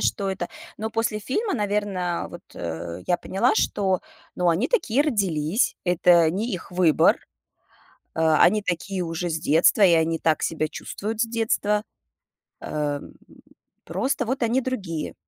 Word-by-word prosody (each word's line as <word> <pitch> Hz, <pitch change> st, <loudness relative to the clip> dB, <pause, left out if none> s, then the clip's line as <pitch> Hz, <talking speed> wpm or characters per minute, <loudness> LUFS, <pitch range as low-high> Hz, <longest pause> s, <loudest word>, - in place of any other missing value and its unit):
что 200 Hz, -1 st, 0 dB
это. 185 Hz, -2 st, -4 dB, 0.3 s
Но 220 Hz, +1 st, -4 dB
после 225 Hz, -1 st, -1 dB
фильма, 400 Hz, -, -1 dB
наверно, 205 Hz, -5 st, -1 dB
вот, 175 Hz, -, -10 dB
э, 85 Hz, +1 st, -5 dB
я 175 Hz, -, +2 dB
поняла, 195 Hz, +8 st, +1 dB
что, 190 Hz, -4 st, +1 dB, 0.3 s
ну, 180 Hz, -1 st, +1 dB
они 170 Hz, +7 st, +2 dB
такие 285 Hz, -, +2 dB
родились. 195 Hz, -, 0 dB
Это 175 Hz, -2 st, +4 dB
не 215 Hz, +8 st, -2 dB
их 180 Hz, -, -6 dB
выбор. 175 Hz, -4 st, +4 dB, 1.0 s
Э, 160 Hz, -1 st, +3 dB
они 210 Hz, +5 st, +5 dB
такие 185 Hz, +1 st, -3 dB
уже 170 Hz, +1 st, -3 dB
с 160 Hz, -1 st, -2 dB
детства, 160 Hz, +7 st, +3 dB
и 185 Hz, -4 st, +7 dB
они 165 Hz, 0 st, +2 dB
так 160 Hz, -1 st, +1 dB
себя 155 Hz, -1 st, -1 dB
чувствуют 215 Hz, +7 st, -6 dB
с -, -, +3 dB
детства. 220 Hz, -2 st, 0 dB, 0.8 s
А, 150 Hz, -1 st, -2 dB
м, -, -, -13 dB, 0.7 s
просто 260 Hz, -1 st, -1 dB
вот 260 Hz, +3 st, -2 dB
они 235 Hz, +3 st, +2 dB
другие. 195 Hz, -12 st, -4 dB
185 Hz, 150 wpm, -24 LUFS, 165-220 Hz, 1.0 s, и